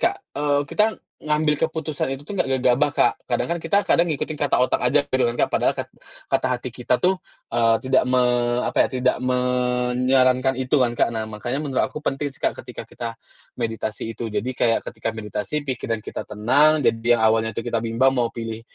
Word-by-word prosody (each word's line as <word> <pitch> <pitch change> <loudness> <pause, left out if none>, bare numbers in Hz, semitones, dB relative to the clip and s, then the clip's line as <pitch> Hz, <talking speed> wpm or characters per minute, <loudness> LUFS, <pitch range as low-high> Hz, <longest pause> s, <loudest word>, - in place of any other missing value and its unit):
Kak, - - -6 0.2
eee, 145 -1 +2
kita 210 +9 +2 0.4
ngambil 150 0 +1
keputusan 160 -3 -2
itu 135 - -5
tuh 205 - -6
nggak 135 -7 +1
gegabah, 130 +4 +3
Kak. - - +3
Kadang - - -1
kan 170 - 0
kita 200 +5 +2
kadang 170 - +4
ngikutin 150 +1 -3
kata 145 -2 +1
otak 125 - +2
aja 125 +4 +4
gitu 130 -1 +1
kan 120 0 0
Kak, - - +3
padahal - - +1
kat - - -5 0.4
kata - - +1
hati 125 0 -3
kita 125 0 0
tuh, 185 +1 +3 0.3
eee, 115 -1 +3
tidak 130 -1 +2
me 125 0 +2 0.4
apa - - +2
ya, - - -1
tidak 125 0 +1
menyarankan 125 +1 +2
itu 130 +3 +1
kan, 120 -2 +2
Kak. - - +3
Nah, 110 -1 -2
makanya 120 +6 -3
menurut 135 -3 0
aku 150 - -7
penting 140 +1 -1
sih - - -12
Kak, - - +2
ketika - - -9
kita 120 - -5 0.5
meditasi 115 -1 -3
itu. 115 - -4
Jadi 105 +5 -2
kayak, 115 -2 +2
ketika - - -5
meditasi 105 +5 -3
pikiran 115 -4 -3
kita - - -5
tenang, 135 +9 +3
jadi 115 +1 +3
yang 110 - -1
awalnya 110 0 +2
tuh 115 - -3
kita 115 -1 0
bimbang 120 +4 +2
mau 120 -1 +2
pilih 115 -1 -5
125 Hz, 200 wpm, -22 LUFS, 115-140 Hz, 0.5 s, kadang